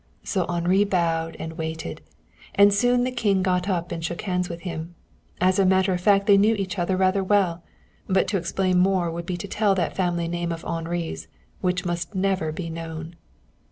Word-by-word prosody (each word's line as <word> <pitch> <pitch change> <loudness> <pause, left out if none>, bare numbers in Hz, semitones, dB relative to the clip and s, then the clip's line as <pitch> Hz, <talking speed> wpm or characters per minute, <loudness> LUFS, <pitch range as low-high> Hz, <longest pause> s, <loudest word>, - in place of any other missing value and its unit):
So 185 -4 -1
Henri 175 +3 +2
bowed 165 -4 0
and 160 0 -7
waited, 160 - -4 0.5
and 200 0 +6
soon 245 +4 +3
the 255 - -1
King 205 -6 +1
got 180 +1 0
up 175 -2 -1
and 165 -1 -4
shook 170 +1 -4
hands 180 -2 -1
with 170 0 -6
him. 170 -1 -6 0.4
As 185 +2 +3
a - - +5
matter 190 0 +3
of 180 - -2
fact 200 0 +4
they 200 -1 +6
knew 215 +3 +4
each 195 -2 -3
other 185 +2 0
rather 190 +1 +2
well, 185 -4 +2 0.5
but 190 0 +2
to 205 - +1
explain 185 +1 0
more 185 -2 +2
would 170 +1 -6
be 180 - -2
to 200 - -6
tell 205 0 +2
that 175 -4 -1
family 175 -2 0
name 170 0 -2
of 165 0 -6
Henri's 165 - -3 0.3
which 180 0 -1
must 175 +2 -3
never 190 -4 0
be 165 +2 -5
known. 165 0 -6
180 Hz, 195 wpm, -24 LUFS, 170-195 Hz, 0.5 s, and